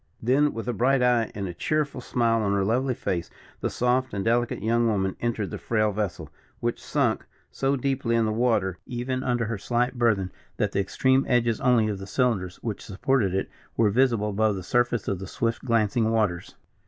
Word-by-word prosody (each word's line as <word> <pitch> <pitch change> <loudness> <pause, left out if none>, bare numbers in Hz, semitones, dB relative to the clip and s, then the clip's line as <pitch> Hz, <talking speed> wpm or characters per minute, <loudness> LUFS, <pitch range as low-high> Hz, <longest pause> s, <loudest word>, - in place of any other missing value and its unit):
Then 140 +5 +3
with 115 +1 -6
a 125 - 0
bright 125 +4 +2
eye 120 -2 +3
and 100 -2 -3
a 90 - -5
cheerful 145 - -1
smile 115 -2 +1
on 100 -1 +1
her 100 -1 +1
lovely 125 +4 +1
face, 85 -6 -3 0.3
the - - -1
soft 125 -1 0
and 100 - -2
delicate 120 -2 +1
young 115 +1 +2
woman 95 -3 0
entered 115 -6 -2
the - - -5
frail 110 -2 +1
vessel, 95 -7 -3 0.3
which - - -2
sunk - - 0 0.3
so 135 +1 0
deeply 130 -3 0
in 115 -1 +3
the 110 - 0
water, 110 -6 +1
even 130 +1 -3
under 120 -2 0
her 110 -2 -3
slight 120 +4 0
burthen, 105 -6 +2 0.3
that - - 0
the - - 0
extreme 130 +6 +2
edges 120 -3 +2
only 120 -4 +4
of 105 -2 -3
the 95 - -8
cylinders 100 -5 0
which 110 -4 -4
supported 100 -1 0
it 95 - -1 0.3
were 110 -3 +4
visible 115 -3 +2
above 105 +1 +1
the 95 - -6
surface 120 +2 +1
of 95 - -1
the 95 - -6
swift 115 +4 -2
glancing 115 -2 +2
waters. 105 -6 -1
115 Hz, 200 wpm, -26 LUFS, 100-125 Hz, 0.3 s, only